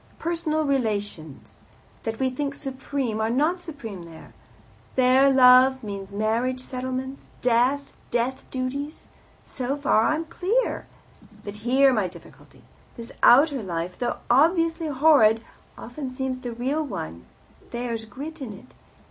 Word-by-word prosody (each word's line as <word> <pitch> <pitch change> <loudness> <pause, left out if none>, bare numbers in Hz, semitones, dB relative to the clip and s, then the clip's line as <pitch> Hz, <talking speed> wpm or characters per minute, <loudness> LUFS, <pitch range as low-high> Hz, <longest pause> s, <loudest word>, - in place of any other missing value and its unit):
Personal 320 -2 -1
relations, 205 - -3 0.5
that 225 0 -2
we 260 -1 +1
think 280 +2 -3
supreme, 265 -5 -3
are 220 - +1
not 305 +9 +1
supreme 260 - -8
there. 165 -1 -13 0.6
There 260 +2 +5
love 260 0 +6
means 200 -2 -6
marriage 225 +5 0
settlements, 260 +1 -5 0.2
death, 255 +4 +2
death 245 +2 -2
duties. 275 +4 -4 0.4
So 265 +2 -3
far 270 -6 +3
I'm 315 +2 0
clear. 390 +9 -1 0.6
But 205 0 -7
here 260 +5 +4
my 210 -5 +1
difficulty. 175 -1 -15 0.3
This 235 0 -8
outer 275 +1 +6
life, 175 -2 -4
though 240 -1 -1
obviously 330 +4 +3
horrid, 265 -7 +4 0.3
often 260 +3 -6
seems 255 0 -3
the 245 -2 -5
real 265 +7 -1
one 85 - -6 0.4
there's 235 -2 -4
grit 290 +8 -8
in 235 -6 -5
it. 200 +6 -15
255 Hz, 130 wpm, -25 LUFS, 225-285 Hz, 0.6 s, love